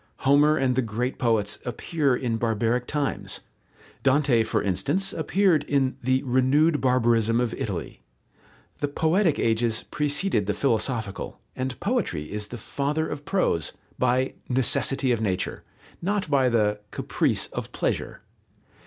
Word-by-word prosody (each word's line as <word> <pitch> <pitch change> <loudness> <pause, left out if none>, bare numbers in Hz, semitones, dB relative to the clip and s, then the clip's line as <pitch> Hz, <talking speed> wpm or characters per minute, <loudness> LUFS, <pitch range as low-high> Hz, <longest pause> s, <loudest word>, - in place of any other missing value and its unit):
Homer 145 +3 +5
and 130 -3 +1
the 130 - +2
great 120 +3 -3
poets 110 -4 +1
appear 140 +2 0
in 120 -3 -1
barbaric 115 +2 0
times. 145 -2 -2 0.6
Dante, 135 -3 +3
for 110 - 0
instance, 145 - 0
appeared 185 -6 +2
in 135 -3 +1
"the 130 +1 +1
renewed 140 +5 +3
barbarism 115 -3 +3
of 120 -2 0
Italy." 85 - -5 0.8
The 145 - 0
poetic 160 +3 +2
ages 115 0 +1
preceded 145 - 0
the 105 - 0
philosophical, 115 -3 -1 0.2
and 130 0 -4
poetry 200 - -1
is 105 0 -3
the 120 - -7
father 145 +7 -1
of 145 0 -6
prose, 180 - 0 0.3
by 125 +1 +1 0.2
"necessity 130 +1 +2
of 115 -2 0
nature," 95 -4 -2 0.4
not 195 -2 -1
by 135 -3 +4
the 105 -3 +1
"caprice - - 0
of - - -5
pleasure." - - -2
130 Hz, 135 wpm, -25 LUFS, 115-145 Hz, 0.8 s, Homer